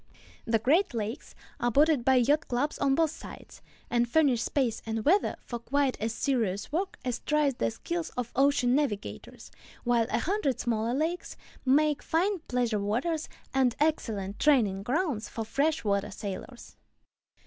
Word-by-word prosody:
The 225 Hz, 0 st, +2 dB
Great 285 Hz, -, +2 dB
Lakes 225 Hz, +5 st, -4 dB, 0.2 s
are 240 Hz, -, +1 dB
bordered 290 Hz, +1 st, +3 dB
by 265 Hz, +1 st, +4 dB
yacht 285 Hz, +6 st, +3 dB
clubs 255 Hz, +5 st, -1 dB
on 275 Hz, -1 st, +3 dB
both 320 Hz, -1 st, +2 dB
sides, -, -, -11 dB, 0.3 s
and 240 Hz, 0 st, +1 dB
furnish 270 Hz, -4 st, +3 dB
space 245 Hz, -3 st, 0 dB
and 225 Hz, -1 st, -3 dB
weather 390 Hz, +6 st, +3 dB
for 240 Hz, -, -5 dB
quite 275 Hz, +2 st, 0 dB
as 225 Hz, +1 st, 0 dB
serious 225 Hz, -6 st, -1 dB
work 370 Hz, +5 st, -2 dB
as 250 Hz, -2 st, -1 dB
tries 300 Hz, -2 st, +1 dB
the 115 Hz, -, -1 dB
skill 340 Hz, -, -3 dB
of 245 Hz, -2 st, -3 dB
ocean 270 Hz, -2 st, +3 dB
navigators, 260 Hz, -8 st, -3 dB, 0.3 s
while 235 Hz, -2 st, +2 dB
a -, -, +1 dB
hundred 285 Hz, -, 0 dB
smaller 230 Hz, 0 st, 0 dB
lakes 325 Hz, +5 st, -2 dB, 0.3 s
make 295 Hz, +2 st, +3 dB
fine 370 Hz, +4 st, 0 dB
pleasure 240 Hz, -4 st, 0 dB
waters 250 Hz, +11 st, -1 dB, 0.2 s
and 260 Hz, -3 st, +2 dB
excellent 220 Hz, -10 st, -1 dB
training 225 Hz, -10 st, +3 dB
grounds 255 Hz, -, -1 dB
for 225 Hz, -, -4 dB
fresh 295 Hz, +6 st, 0 dB
water 200 Hz, -1 st, 0 dB
sailors. 205 Hz, +5 st, -8 dB
255 Hz, 155 wpm, -28 LUFS, 225-300 Hz, 0.3 s, by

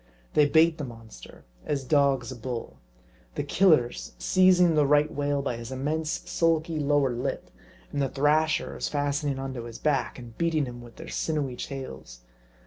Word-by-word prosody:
They 150 Hz, -1 st, +5 dB
bait 160 Hz, +2 st, +4 dB
the -, -, -3 dB
mon 115 Hz, -3 st, -10 dB
ster, -, -, -13 dB, 0.2 s
as 140 Hz, -2 st, -2 dB
dogs 135 Hz, -3 st, +2 dB
a -, -, -6 dB
bull. 120 Hz, 0 st, -6 dB, 0.6 s
The -, -, -1 dB
Killers 155 Hz, -11 st, +2 dB
seizing 180 Hz, -2 st, +4 dB
the 150 Hz, -2 st, +3 dB
Right 150 Hz, +1 st, +3 dB
whale 145 Hz, -1 st, -1 dB
by 125 Hz, -4 st, -2 dB
his 115 Hz, +1 st, -8 dB
immense, 150 Hz, +4 st, -2 dB
sulky 165 Hz, -1 st, +1 dB
lower 145 Hz, -2 st, +2 dB
lip, 120 Hz, -, -4 dB, 0.4 s
and 145 Hz, -, -1 dB
the 135 Hz, -, +1 dB
Thrashers 155 Hz, +3 st, +1 dB
fastening 145 Hz, -1 st, -1 dB
on 135 Hz, 0 st, -4 dB
to 120 Hz, -2 st, -6 dB
his 115 Hz, -1 st, -8 dB
back, 140 Hz, 0 st, 0 dB
and 120 Hz, -3 st, -11 dB
beating 165 Hz, -3 st, +1 dB
him 120 Hz, -1 st, -8 dB
with 120 Hz, -1 st, -13 dB
their -, -, -10 dB
sinewy 145 Hz, -5 st, -2 dB
tails. 65 Hz, -, -7 dB
140 Hz, 170 wpm, -27 LUFS, 125-155 Hz, 0.6 s, They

